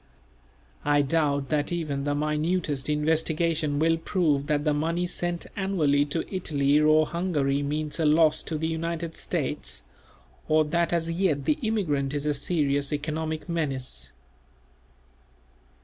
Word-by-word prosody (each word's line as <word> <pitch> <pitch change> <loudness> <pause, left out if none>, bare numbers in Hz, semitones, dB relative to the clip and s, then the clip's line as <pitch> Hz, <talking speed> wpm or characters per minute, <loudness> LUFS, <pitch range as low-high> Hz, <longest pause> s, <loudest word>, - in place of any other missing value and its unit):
I 145 0 +3
doubt 140 -2 0
that 150 0 0
even 150 -5 -2
the 145 0 0
minutest 150 -1 -1
investigation 155 0 +1
will 165 +2 +3
prove 155 -5 0
that 150 -1 +1
the 150 - +3
money 165 +4 0
sent 175 -1 -2
annually 155 -8 +2
to 155 +3 -2
Italy 145 -5 +2
or 155 +1 +5
Hungary 150 -5 0
means 150 +2 -2
a 160 - +2
loss 155 0 +4
to 160 - -4
the 160 - -2
United 165 0 -3
States, - - -3 0.6
or 155 0 +4
that 170 +3 0
as 165 -1 0
yet 165 -5 0
the 305 - +1
immigrant 150 - 0
is 145 0 -2
a 150 - +2
serious 140 -2 0
economic 155 +2 -3
menace. 135 - -2
155 Hz, 135 wpm, -26 LUFS, 145-165 Hz, 0.6 s, or